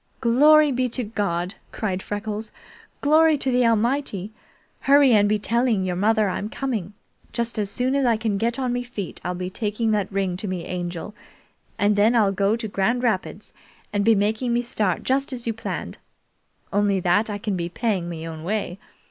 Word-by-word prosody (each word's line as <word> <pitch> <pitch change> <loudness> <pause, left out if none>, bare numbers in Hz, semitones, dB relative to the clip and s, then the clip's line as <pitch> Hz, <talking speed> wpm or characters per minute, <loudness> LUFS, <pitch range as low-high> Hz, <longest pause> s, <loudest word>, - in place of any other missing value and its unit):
"Glory 295 +5 +5
be 255 0 0
to 250 +2 -2
God!" 195 -4 -2 0.2
cried 190 -4 -2
Freckles. 210 +2 -4 0.5
"Glory 310 +1 +5
to 265 -1 0
the 250 -1 +3
Almighty! 230 -3 0 0.5
Hurry 280 -1 +5
and 205 -2 +4
be 215 - +2
telling 230 -1 +1
your 180 -1 -1
mother 215 +3 +2
I'm 200 +2 -3
coming! 220 -8 -3 0.4
Just 235 -2 -2
as 205 -2 -1
soon 250 +6 -1
as 280 0 +2
I 235 -3 +3
can 215 -3 -1
get 230 +2 0
on 255 -2 -1
me 245 - -1
feet 235 -6 -6
I'll 180 0 -2
be 180 +1 -4
taking 215 +2 -1
that 205 -2 0
ring 190 -2 -1
to 205 - -5
me 185 -2 -4
Angel, 175 +2 -5 0.6
and 205 0 +2
then 215 +4 +4
I'll 210 -4 +4
go 200 +2 +1
to 230 -1 -4
Grand 220 +5 0
Rapids 210 -2 -2 0.4
and 205 -1 +1
be 225 +1 +5
making 220 +4 0
me 240 +1 +1
start 210 -7 -1
just 270 +2 0
as 245 -2 -6
you 230 - -1
planned, 225 - -5 0.7
only 200 -1 +2
that 185 +5 +2
I 205 - -3
can 205 -1 -2
be 170 -1 -3
paying 190 -3 -1
me 165 -1 -6
own 160 -1 -7
way. 195 -1 -2
215 Hz, 190 wpm, -23 LUFS, 195-240 Hz, 0.7 s, Glory